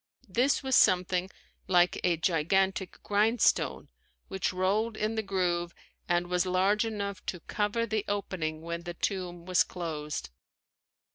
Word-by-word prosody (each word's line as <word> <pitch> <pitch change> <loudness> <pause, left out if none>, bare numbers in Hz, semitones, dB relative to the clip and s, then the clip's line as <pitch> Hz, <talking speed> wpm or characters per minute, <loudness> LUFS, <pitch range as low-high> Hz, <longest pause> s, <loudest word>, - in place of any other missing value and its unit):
This 245 +9 +2
was 265 -1 +2
something 180 0 +3 0.4
like 175 -1 +3
a 175 -2 +2
gigantic 190 +3 +1
grindstone 215 +3 +2 0.4
which 190 -1 -1
rolled 205 +5 0
in 215 +1 -1
the 220 - -1
groove 175 -4 -1 0.3
and 175 0 +2
was 180 +1 0
large 190 +4 +2
enough 200 -3 -4
to 180 - -3
cover 210 +5 -1
the 215 -2 -1
opening 165 -6 -3
when 170 0 -4
the 175 0 -7
tomb 175 -3 -3
was 185 -1 +3
closed. 150 - -5
185 Hz, 135 wpm, -29 LUFS, 175-205 Hz, 0.4 s, something